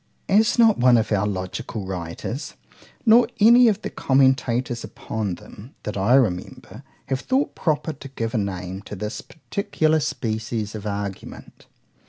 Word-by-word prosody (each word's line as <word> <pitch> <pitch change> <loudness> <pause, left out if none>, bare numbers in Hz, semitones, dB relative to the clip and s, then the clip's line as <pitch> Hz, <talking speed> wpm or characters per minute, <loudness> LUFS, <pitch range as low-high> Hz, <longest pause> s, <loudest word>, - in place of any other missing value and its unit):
As 210 +4 +3
not 225 - +5
one 125 0 +6
of 110 -1 -1
our 105 -1 +2
logical 95 +1 -4
writers, 95 - -5 0.5
nor 230 +1 +6
any 235 +3 +7
of 210 -4 +1
the - - -4
commentators 130 -3 +1
upon 105 -5 -4
them, 115 +10 -14
that 105 - -4
I 100 +6 +3
remember, 105 -10 -1 0.3
have 135 -1 0
thought 265 - 0
proper 155 0 -1
to 140 -1 -11
give 115 -4 -4
a 115 - +1
name 95 -1 -4
to - - -5
this 105 +4 -5
particular 160 -2 -1
species 110 -6 -3
of 105 -1 -6
argument. 100 -1 -7
120 Hz, 150 wpm, -23 LUFS, 100-155 Hz, 0.5 s, any